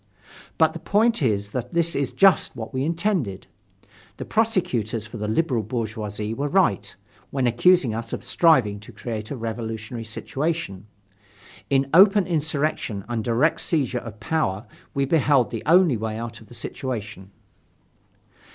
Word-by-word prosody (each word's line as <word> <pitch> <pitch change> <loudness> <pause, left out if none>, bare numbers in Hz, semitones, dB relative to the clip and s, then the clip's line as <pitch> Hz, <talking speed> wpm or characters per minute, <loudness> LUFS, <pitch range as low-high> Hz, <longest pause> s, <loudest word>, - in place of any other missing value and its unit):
But - - +4
the - - -7
point 225 0 +2
is 105 -5 0
that 125 +4 -5
this 170 0 +2
is 140 -2 -1
just 195 -4 +4
what 110 +3 -7
we 130 0 -1
intended. 165 - -1 0.7
The - - -6
prosecutors 125 - 0
for 110 +1 -9
the 105 0 -3
liberal 120 +1 +1
bourgeoisie 110 -1 -4
were 140 +5 -2
right, 150 - +1 0.3
when 135 -2 -1
accusing 125 +2 +4
us 115 +1 -5
of - - -4
striving 125 -12 +3
to 105 - -13
create 110 -3 -6
a - - -4
revolutionary 115 0 -5
situation. 115 - -3 0.8
In 135 0 +2
open 195 +2 +7
insurrection 150 - -2
and 120 -2 -2
direct 125 +8 +2
seizure 135 -7 0
of 115 -2 -10
power 115 -6 -1 0.3
we 140 0 +1
beheld 140 -4 +3
the 115 - -4
only 170 -6 +5
way 110 0 -3
out 115 -1 -6
of 110 - -15
the 120 - -13
situation. 110 -5 -5
120 Hz, 150 wpm, -24 LUFS, 110-160 Hz, 0.8 s, open